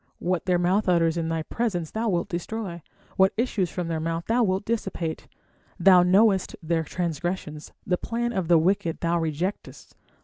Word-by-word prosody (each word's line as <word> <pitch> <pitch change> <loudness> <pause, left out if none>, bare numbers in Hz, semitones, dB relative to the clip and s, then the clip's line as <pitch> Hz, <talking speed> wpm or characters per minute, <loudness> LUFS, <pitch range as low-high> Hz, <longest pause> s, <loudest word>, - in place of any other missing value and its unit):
What 180 -1 -1
their 180 -1 +3
mouth 185 +3 +1
utters 165 -2 +3
in 165 -1 -2
thy 165 -1 -1
presence 180 -6 -2
Thou 225 +1 -1
wilt 175 -2 0
destroy, 180 -1 -5 0.4
what 190 0 +4
issues 215 -6 0
from 175 0 -4
their 165 -1 -2
mouth 165 +1 -3
thou 235 +2 +2
wilt 190 -2 0
dissipate. 195 -7 -3 0.5
Thou 180 0 +7
knowest 190 +2 +3
their 165 0 0
transgressions, 165 -1 -4
the 180 - +1
plan 240 +3 -2
of 190 -5 -1
the 170 0 +6
wicked 175 0 0
thou 170 0 +1
rejectest. 165 +5 -4
180 Hz, 170 wpm, -25 LUFS, 165-200 Hz, 0.5 s, Thou